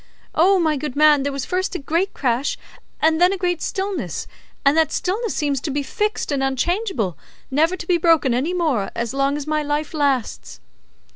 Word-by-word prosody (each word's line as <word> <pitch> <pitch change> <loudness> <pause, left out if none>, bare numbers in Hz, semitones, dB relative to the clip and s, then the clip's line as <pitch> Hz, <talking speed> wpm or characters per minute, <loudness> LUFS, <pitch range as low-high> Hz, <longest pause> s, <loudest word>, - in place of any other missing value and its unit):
O, 380 +5 +4
my 315 -3 +1
good 270 -2 -5
man, 300 -1 +5
there 280 +1 -1
was 275 -2 -4
first 370 +1 -2
a - - +1
great 335 +7 -1
crash, 255 +1 -1 0.5
and 320 +1 +3
then 360 +1 +6
a 390 - -1
great 355 -2 -1
stillness, 390 -2 -3 0.4
and 275 +2 +5
that 320 -1 +3
stillness 425 +4 -2
seems 285 -3 0
to 300 - -3
be 285 +1 -1
fixed 420 +3 -2
and 280 -2 0
unchangeable, 270 - -1 0.3
never 320 +6 +2
to 345 - -8
be 350 0 +2
broken 320 -6 +3
any 265 +8 0
more 310 - 0
as 235 0 -2
long 275 +1 +1
as 295 - -5
my 305 0 0
life 295 +1 -2
lasts." 275 - -1
305 Hz, 195 wpm, -21 LUFS, 275-355 Hz, 0.5 s, then